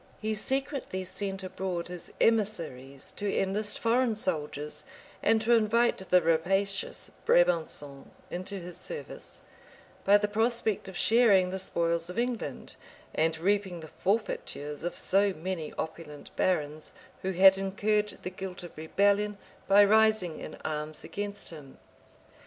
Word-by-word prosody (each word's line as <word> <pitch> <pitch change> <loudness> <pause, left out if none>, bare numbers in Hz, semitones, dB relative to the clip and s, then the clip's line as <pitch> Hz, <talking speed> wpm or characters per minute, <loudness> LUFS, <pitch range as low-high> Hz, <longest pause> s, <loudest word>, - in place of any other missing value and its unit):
He 215 0 -1
secretly 265 -3 -2
sent 195 +1 -3
abroad 185 -2 -3
his 180 -1 -7
emissaries 165 - 0
to 205 -1 -1
enlist 205 +2 0
foreign 235 0 +2
soldiers, 150 -6 -2 0.4
and 225 - +4
to 235 +2 +4
invite 230 +1 +3
the 180 -1 +5
rapacious 195 +5 0
Brabançons 160 -5 +2 0.2
into 185 +3 -3
his 180 -1 -8
service, 480 - -7 0.6
by 200 +1 +6
the 210 0 0
prospect 220 -1 0
of 190 -2 -7
sharing 205 -6 +5
the 190 - -3
spoils 170 -2 0
of 180 - -7
England, 240 -1 -3 0.4
and 160 +1 +1
reaping 190 0 0
the 160 - -10
forfeitures 150 -8 -2
of 175 - -3
so 200 +1 +3
many 170 -2 -4
opulent 155 -2 -7
barons, 155 -4 -1 0.3
who 190 0 -2
had 190 +2 +8
incurred 210 +2 0
the 185 - -4
guilt 185 -1 -6
of 175 - -10
rebellion, 200 +6 +1 0.3
by 205 +1 +7
rising 215 -5 +3
in - - -7
arms 150 0 -4
against 205 -1 -4
him. 145 -5 -11
190 Hz, 135 wpm, -29 LUFS, 165-210 Hz, 0.6 s, had